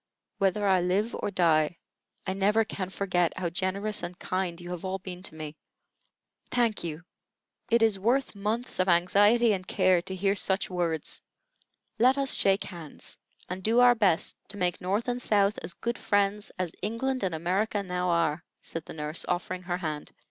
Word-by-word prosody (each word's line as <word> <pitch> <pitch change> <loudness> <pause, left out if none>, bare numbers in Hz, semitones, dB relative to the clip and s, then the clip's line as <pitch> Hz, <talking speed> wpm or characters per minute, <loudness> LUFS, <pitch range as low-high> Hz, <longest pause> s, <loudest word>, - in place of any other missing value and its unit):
Whether 195 +1 +2
I 190 -2 +4
live 195 +6 +1
or - - -2
die, 165 -3 +2 0.5
I 190 - -1
never 205 +3 +3
can 190 -3 -4
forget 180 -3 0
how 175 -2 -2
generous 195 +4 -1
and 175 +1 -6
kind 185 -3 -2
you 175 0 -8
have 180 -2 -5
all 190 0 -2
been 180 -1 -8
to 170 - -10
me." 155 -1 -7 0.9
"Thank 235 -5 +1
you! 165 0 -5 0.7
It 235 0 +4
is 215 -3 +3
worth 250 +7 +1
months 215 +4 -2
of 185 +1 +3
anxiety 205 +6 +5
and 185 -2 -4
care 185 -2 +3
to 190 +1 -4
hear 195 +1 +2
such 195 -1 0
words. 170 -4 -2 0.8
Let 255 +4 +5
us 275 -1 +1
shake 195 0 +3
hands, 170 -6 -8 0.3
and 185 +1 -5
do 225 +5 +3
our 245 0 +8
best 200 -8 +1
to 205 - -7
make 180 -2 0
North 200 +6 -1
and 245 0 -1
South 205 -3 +2
as 175 - -2
good 235 +1 -3
friends 205 0 +1
as 185 -3 -2
England 240 +6 -1
and 185 -4 -1
America 195 +5 0
now 180 -1 -1
are," 165 -2 +1 0.2
said 165 -1 -5
the - - -9
nurse, 150 +1 -2
offering 185 +1 -2
her 175 -1 -2
hand. 155 -4 -4
190 Hz, 180 wpm, -28 LUFS, 175-210 Hz, 0.9 s, our